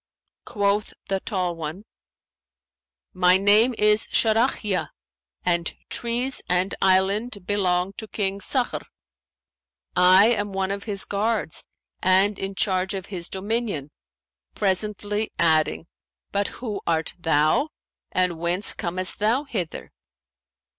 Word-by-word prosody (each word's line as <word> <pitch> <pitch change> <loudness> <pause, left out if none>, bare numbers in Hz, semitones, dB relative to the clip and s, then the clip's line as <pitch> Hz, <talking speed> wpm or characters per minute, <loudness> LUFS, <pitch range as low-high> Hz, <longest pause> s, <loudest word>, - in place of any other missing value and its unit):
Quoth 205 -2 0
the 195 0 0
tall 185 -4 -2
one, 165 +5 -6 1.3
'My 180 0 +5
name 210 +5 +4
is 210 +1 +3
Sharαhiyα 220 -3 +1 0.6
and 170 -2 0 0.2
trees 240 +3 0
and 180 +2 +1
island 195 +2 +2
belong 185 -2 0
to 220 - -7
King 200 -2 -2
Sakhr;[FN#524] 250 +5 0 1.1
I 185 +2 +7
am 205 -4 0
one 190 0 -1
of 200 0 -4
his 200 -3 -3
guards 210 -4 -1 0.4
and 190 +2 +3
in 195 0 -4
charge 190 -1 0
of 190 -2 -5
his 175 -2 -5
dominion,' 200 - -2 0.6
presently 205 +2 -1
adding, 160 0 +2 0.5
'But 200 0 0
who 215 -5 -5
art 165 -1 0
thou 160 - +2 0.4
and 180 -3 0
whence 175 +4 +1
comest 185 0 -1
thou 225 +7 +2
hither?' 195 - -5
195 Hz, 115 wpm, -24 LUFS, 180-210 Hz, 1.3 s, I